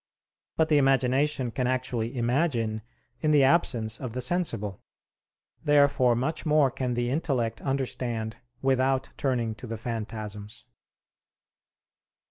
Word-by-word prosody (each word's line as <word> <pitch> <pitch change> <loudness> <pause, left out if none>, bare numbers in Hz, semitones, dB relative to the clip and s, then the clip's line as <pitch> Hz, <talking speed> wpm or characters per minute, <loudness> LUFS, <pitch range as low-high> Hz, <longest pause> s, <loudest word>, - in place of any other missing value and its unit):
But 160 -1 +2
the 150 -2 +5
imagination 135 0 +2
can 125 +2 -1
actually 125 -2 -2
imagine 120 -3 0 0.4
in 155 - +1
the 150 -2 +5
absence 120 -7 +2
of 125 -4 -5
the 125 - -3
sensible. 120 - -1 0.8
Therefore 140 -5 +4
much 135 +7 -2
more 150 -4 +3
can 130 -1 -2
the 120 0 -1
intellect 130 -7 -1
understand 120 -4 -2 0.3
without 130 0 +2
turning 120 -5 -1
to 110 +3 -10
the 115 0 -4
phantasms. 110 -2 -6
125 Hz, 115 wpm, -27 LUFS, 115-140 Hz, 0.8 s, the